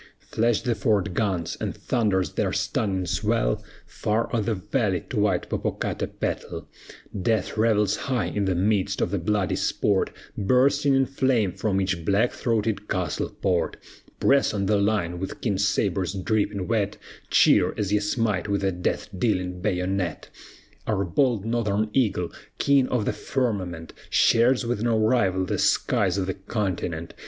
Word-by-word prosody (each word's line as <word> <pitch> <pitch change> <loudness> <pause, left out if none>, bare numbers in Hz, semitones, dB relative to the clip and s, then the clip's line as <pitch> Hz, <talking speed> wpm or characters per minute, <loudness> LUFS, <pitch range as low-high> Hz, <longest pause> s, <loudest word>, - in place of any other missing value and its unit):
Flash 115 0 +1
the 120 -2 +1
fort 100 -4 0
guns, 95 -5 -1
and - - -3
thunders 100 -9 0
their - - -1
stunning 95 -3 -1
swell - - 0 0.2
Far 110 +3 -1
o'er 115 - +2
the 110 +1 -1
valley 95 - -1
to - - -1
white 100 -4 +1
Popocatapetl, - - -3 0.6
Death 110 -1 0
revels 105 -2 +2
high 130 -4 -1
in 100 -1 -1
the 95 -1 +1
midst 100 +1 +1
of - - 0
the 100 - 0
bloody 100 +1 0
sport, 100 -2 +1 0.3
Bursting 135 +6 +3
in 135 0 +3
flame 130 -7 +1
from 95 +1 -1
each 95 -3 -1
black 100 +7 +2
throated 110 -3 -1
castle 90 -5 -1
port, 90 -4 -1 0.4
Press 140 -5 +3
on 100 -1 0
the 105 +1 +2
line 100 -4 0
with 95 - -5
keen 100 -5 -1
sabres 95 -2 0
dripping 100 -1 -1
wet, 105 -3 0 0.3
Cheer, - - +4
as 100 -1 -1
ye 105 - +4
smite 105 -2 0
with 100 -1 0
the 95 -1 +1
death 90 0 -2
dealing 90 -3 -1
bayonet! 95 -2 -2 0.6
Our 100 -3 0
bold 115 - +1
Northern 110 -2 0
eagle, 100 -9 +1 0.3
king 140 -2 +3
of 120 -5 0
the - - 0
firmament, 95 -11 -3 0.2
Shares 120 +2 +4
with 115 -3 -1
no 115 -1 +2
rival 110 -5 +2
the - - -2
skies 95 -2 +2
of 95 - 0
the 95 - -2
continent. 95 -5 -3
100 Hz, 155 wpm, -25 LUFS, 95-115 Hz, 0.6 s, Cheer